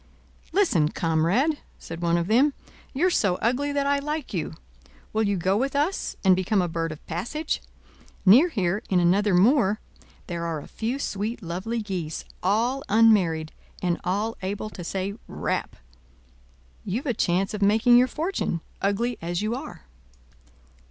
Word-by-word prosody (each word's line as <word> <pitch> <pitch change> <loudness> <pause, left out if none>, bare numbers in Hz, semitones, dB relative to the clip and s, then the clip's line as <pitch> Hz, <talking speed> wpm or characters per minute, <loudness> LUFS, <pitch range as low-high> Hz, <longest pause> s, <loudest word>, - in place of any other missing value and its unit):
"Listen, 195 - +3
comrade," 175 - +1 0.2
said 165 +1 -8
one 170 0 +2
of 170 - 0
them. 255 +8 +3 0.4
"You're 350 +7 +2
so 200 - +2
ugly 255 +8 0
that 285 -1 0
I 280 0 +2
like 300 -2 -4
you. 160 -3 -3 0.6
Will 220 - +1
you 200 -2 +1
go 185 +3 +1
with 270 +6 0
us, 305 +7 0
and 190 -2 +6
become 190 +3 +1
a 180 - +1
bird 165 -1 -2
of 155 - -10
passage? 240 - -3 0.6
Near 250 - +7
here, 195 - 0
in 185 - +3
another 190 +3 +3
moor, 215 +1 +4 0.5
there 170 -2 -4
are 165 -2 -2
a - - -11
few 230 +4 -3
sweet 220 -3 -3
lovely 190 +7 -3
geese, 180 -6 -4 0.2
all 230 +8 +1
unmarried, 195 -8 +4 0.3
and 175 -1 0
all 205 +5 -1
able 205 +3 -4
to 180 - -8
say 190 +3 -3
'Rap?' - - -3 1.1
You've 235 +10 -3
a 255 - +1
chance 195 0 0
of' 210 - -4
making 220 +4 +5
your 250 +1 +6
fortune, 315 - -2 0.2
ugly 220 +4 0
as 175 +3 -2
you 215 +2 0
are." 250 - -7
205 Hz, 160 wpm, -25 LUFS, 175-245 Hz, 1.1 s, Near